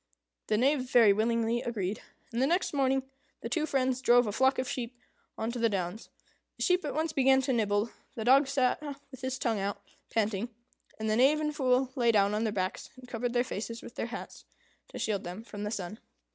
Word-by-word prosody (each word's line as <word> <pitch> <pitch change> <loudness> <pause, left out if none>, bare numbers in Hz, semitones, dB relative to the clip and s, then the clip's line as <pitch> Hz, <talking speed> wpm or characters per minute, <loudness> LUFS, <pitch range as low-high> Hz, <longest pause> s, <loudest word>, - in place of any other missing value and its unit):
The 215 - +2
Knave 260 +1 +2
very 230 -5 +6
willingly 230 +2 +1
agreed, 210 -4 -3 0.3
and 235 - -2
next 350 0 +1
morning 270 -1 +2 0.4
the 230 - -5
two 310 +6 0
friends 260 -2 0
drove 245 -1 +5
a 210 - -2
flock 265 +5 +3
of 255 - -1
sheep 245 -1 -4 0.4
on 225 +1 -2
to 245 - -5
the 230 0 +3
downs. 195 +1 -3 0.5
The - - -2
sheep 360 0 +3
at 290 - -3
once 315 0 0
began 265 -1 +5
to 265 0 +1
nibble, 210 -1 +1 0.2
the 220 - -4
dog 270 +3 +6
sat 270 -1 +1 0.3
with 260 - -11
his 260 0 -2
tongue 225 -5 0
out, 200 +1 -2 0.3
panting, 220 0 0 0.5
and 220 - -3
the 215 0 +2
Knave 275 +5 +5
and 300 -1 -2
Fool 260 -2 +2
lay 240 -3 +3
down 200 -2 +3
on 215 +2 0
their 215 - 0
backs, 185 -2 -3
and 255 -1 -13
covered 240 0 -3
their 245 0 +3
faces 230 -1 -5
with - - -10
their - - -3
hats 240 +2 -8 0.4
to - - -9
shield 205 -3 -1
them 180 +5 -7
from 210 -2 -6
the - - -2
sun. 205 -1 -5
235 Hz, 215 wpm, -30 LUFS, 215-260 Hz, 0.5 s, very